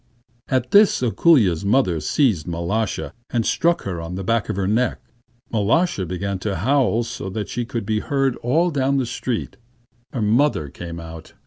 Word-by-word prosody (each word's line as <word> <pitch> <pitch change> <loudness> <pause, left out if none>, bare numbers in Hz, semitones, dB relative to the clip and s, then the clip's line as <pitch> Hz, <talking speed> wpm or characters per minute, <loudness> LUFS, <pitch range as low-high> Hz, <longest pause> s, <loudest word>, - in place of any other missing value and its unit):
At 130 -2 0
this 205 -7 +5
Ako√∫lya's 115 - +3
mother 100 -6 +2
seized 100 - +1
Mal√°sha, 85 -2 -2 0.2
and 115 -2 0
struck 170 0 +1
her 90 -4 -4
on 85 +2 -6
the 95 - -4
back 115 +3 0
of - - -1
her 95 -1 -1
neck. 115 +5 +1 0.5
Mal√°sha 110 - +1
began 95 +2 -3
to 100 0 -2
howl 120 - +2
so 95 - -6
that 105 +2 -4
she 120 0 -3
could 115 -2 -4
be 110 +1 0
heard 135 0 0
all 165 +9 +1
down 140 -1 +1
the 130 - +1
street. 120 0 -4 0.5
Her 120 - -2
mother 110 - +2
came 85 +3 -8
out. 80 -1 -10
110 Hz, 175 wpm, -21 LUFS, 90-130 Hz, 0.5 s, this